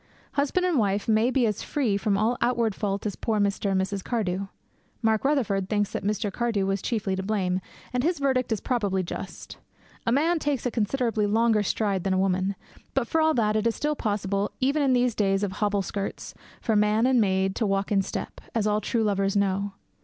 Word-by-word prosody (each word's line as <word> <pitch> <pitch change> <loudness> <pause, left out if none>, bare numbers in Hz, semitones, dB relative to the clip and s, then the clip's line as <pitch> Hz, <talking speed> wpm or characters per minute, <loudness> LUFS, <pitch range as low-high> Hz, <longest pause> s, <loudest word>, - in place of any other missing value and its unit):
Husband 295 +6 +1
and 345 -7 +2
wife 200 -1 0
may 220 +2 +3
be 260 -2 +2
as 210 -3 -1
free 255 -9 0
from 200 0 +1
all 220 +4 +2
outward 235 -3 +1
fault 200 0 -2
as 205 - -2
poor 220 -2 -1
Mr. 200 0 0
and 190 -1 +2
Mrs. 195 0 -2
Cardew. 195 -5 -1 0.6
Mark 220 -1 +2
Rutherford 225 -10 +1
thinks 205 -2 0
that - - -4
Mr. 205 0 -1
Cardew 230 -4 0
was 195 0 -1
chiefly 205 -5 -1
to 190 - -2
blame, 190 -2 0 0.3
and 250 - +1
his 335 +6 +1
verdict 260 -4 0
is 220 - +1
probably 205 -7 0
just. 175 - -7 0.5
A - - +3
man 320 +6 +2
takes 290 -5 -1
a 245 - +1
considerably 225 -1 0
longer 225 0 +3
stride 200 -2 0
than 195 - +1
a - - +1
woman; 190 +1 +1 0.4
but, 265 -3 +1
for 320 - +1
all 315 0 +3
that, 215 -3 +2
it 215 +1 +2
is 230 - 0
still 300 0 -1
possible, 205 -4 -1
even 280 +3 +2
in 270 -2 +3
these 245 -1 +2
days 195 -1 +1
of 200 - -1
hobble 205 0 0
skirts, 200 +1 -5 0.3
for 220 - +1
man 210 +2 +3
and 255 -2 +4
maid 190 -1 +1
to 220 - +1
walk 195 +1 0
in 200 -2 +4
step, 195 - -5
as 220 -2 +1
all 210 0 +1
true 225 +2 0
lovers 195 -1 +1
know. 200 0 0
210 Hz, 215 wpm, -26 LUFS, 195-240 Hz, 0.6 s, and